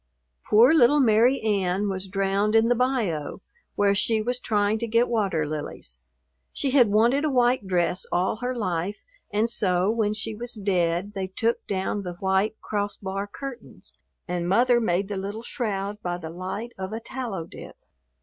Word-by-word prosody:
Poor 235 +8 +6
little 295 -1 +5
Mary 240 +1 +4
Ann 200 -2 0
was 190 -1 -3
drowned 195 +2 0
in 225 +1 +4
the 245 - +4
bayou, 225 - -1 0.4
where 200 -1 +3
she 220 +3 +2
was 245 +3 -2
trying 210 -2 +1
to 235 - -2
get 230 +2 +3
water 195 -9 0
lilies. 145 - -6 0.5
She 275 - -1
had 255 -4 +5
wanted 235 +7 +3
a 310 - +2
white 245 -5 +2
dress 180 0 0
all 185 +4 +1
her 250 +2 -3
life 185 -2 -2 0.3
and 210 +2 +1
so, 190 -3 +1
when 215 -2 0
she 220 +1 -4
was 235 +3 -4
dead, 185 -1 0
they 190 -2 -3
took 225 +5 -1
down 195 +1 -2
the 180 -2 -5
white 190 +4 0
cross 205 -1 -2
bar 195 +1 -4
curtains 270 +3 -9 0.3
and 175 -1 -2
Mother 240 +4 +4
made 195 -2 0
the 200 -1 -4
little 200 +4 -5
shroud 210 -4 -3
by 175 -1 -2
the 160 -2 -7
light 190 +7 -5
of 190 +2 -4
a 225 - -3
tallow 230 -7 -5
dip. - - -11
205 Hz, 175 wpm, -25 LUFS, 190-235 Hz, 0.5 s, Poor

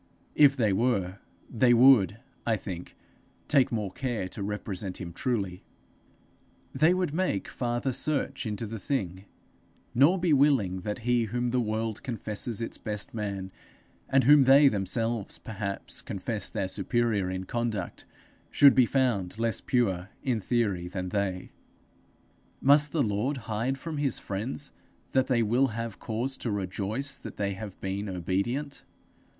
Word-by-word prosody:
If 140 -2 +5
they 110 -5 +2
were, 100 -4 0 0.3
they 120 +1 +3
would, 115 -5 +6 0.3
I 110 -2 +1
think, 90 -3 -7 0.5
take 135 -4 +3
more 105 -5 -2
care 120 -5 -3
to 100 - -7
represent 100 -2 -4
him 85 -2 -6
truly; 95 -4 -2 1.1
they 160 +3 +4
would 180 -5 -1
make 165 - -1
farther 120 +1 -2
search 140 -1 -1
into 105 +2 -3
the 110 +1 -6
thing, 95 -7 -3 0.7
nor 145 +10 +5
be 175 -3 +2
willing 135 -10 +3
that 105 +4 -5
he 120 -1 +3
whom 120 +2 -2
the 125 - +1
world 110 -1 -2
confesses 115 -1 -3
its - - -5
best 105 -2 -4
man, 100 -4 -4 0.6
and 135 0 +4
whom 145 +1 +7
they 140 +2 +7
themselves, 115 +1 -1
perhaps, 100 -3 -4
confess 105 +3 -3
their 95 - -2
superior 105 0 0
in 95 0 -3
conduct, 115 +1 -3 0.4
should 140 -1 +7
be 130 -3 +4
found 115 -9 0
less 115 0 0
pure 95 -7 0
in 125 -5 0
theory 100 -6 0
than 90 0 -4
they. 95 -2 -2 1.1
Must 145 +1 +5
the 155 -4 +1
Lord 110 +6 -1
hide 115 +3 -2
from 160 +1 -5
his 145 -2 0
friends 115 +8 -4 0.4
that 130 -1 +2
they 120 -3 +2
will 120 +5 +3
have 115 -2 -5
cause 125 +4 -3
to 120 - -3
rejoice 105 +7 -2
that - - -10
they 100 -1 -1
have 100 0 -8
been 100 +2 -3
obedient? 100 - -2
115 Hz, 145 wpm, -28 LUFS, 100-130 Hz, 1.1 s, whom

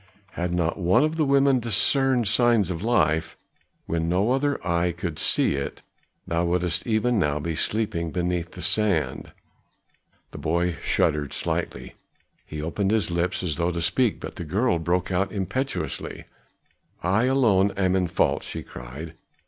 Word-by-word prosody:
Had 90 0 -3
not 85 +1 -1
one 90 +9 +3
of 155 +1 0
the 160 -2 +1
women 140 -1 +4
discerned 120 +2 +2
signs 110 -2 +3
of 85 -2 -4
life, 80 -9 +1 0.5
when 85 0 -1
no 95 +7 +2
other 140 +2 +1
eye 85 +1 +1
could 85 -2 -5
see - - +3
it, 70 0 -5 0.4
thou 85 +1 0
wouldst 85 +1 0
even 115 +1 +1
now 75 -4 +1
be 80 +2 -3
sleeping 85 -2 0
beneath 90 0 -2
the 90 - -7
sand." 100 -8 0 1.0
The - - -8
boy 85 +2 0
shuddered 75 -2 0
slightly; - - -2 0.5
he 75 -1 -6
opened 95 +5 -1
his 105 -5 +2
lips 85 +2 -1
as 80 -5 -1
though 85 +1 0
to 85 -1 -3
speak, 115 +6 +1
but - - -8
the - - -5
girl 95 +4 +1
broke 90 +3 -1
out 95 +1 0
impetuously: 125 +8 -3 0.8
"I 100 +7 +2
alone 115 -7 +3
am 95 -1 +2
in 90 -1 +1
fault," 85 - +1
she - - -6
cried. 70 +7 -9
90 Hz, 155 wpm, -25 LUFS, 85-110 Hz, 1.0 s, women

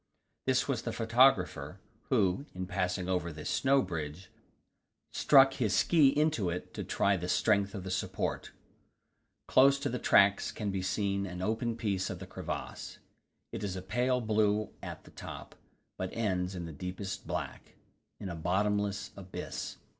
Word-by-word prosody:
This - - +2
was - - -1
the - - -3
photographer, 110 - +2 0.3
who, 95 +10 +2
in 90 0 -3
passing 90 0 -1
over 90 -2 -1
this 75 -1 -5
snow 135 0 +3
bridge, 85 0 -6 0.8
struck 135 -1 +6
his 110 -6 0
ski 160 -5 +5
into 150 - +2
it 90 +1 -5
to - - -4
try 100 0 +2
the 90 +1 -4
strength 100 +2 +2
of 95 - -5
the 95 - -5
support. - - -2 1.0
Close 135 +1 +6
to 140 0 -2
the 125 0 -3
tracks 100 -2 +4
can 105 -2 -3
be 95 -1 -2
seen 100 +1 -1
an 90 0 -5
open 115 +3 -1
piece 100 -5 -1
of 95 - -4
the 95 - -8
crevasse; 90 - -6 0.5
it - - -5
is 95 -2 -2
a 95 - -4
pale 125 +6 +1
blue 110 -1 +1
at - - -7
the - - -16
top, - - -9 0.4
but 95 0 -3
ends 95 -4 -1
in 85 -2 -4
the 80 - -7
deepest 90 +5 -6
black - - -5 0.4
in 100 - -5
a 90 - -4
bottomless 100 +4 0
abyss. 95 -2 -6
100 Hz, 160 wpm, -31 LUFS, 90-115 Hz, 1.0 s, struck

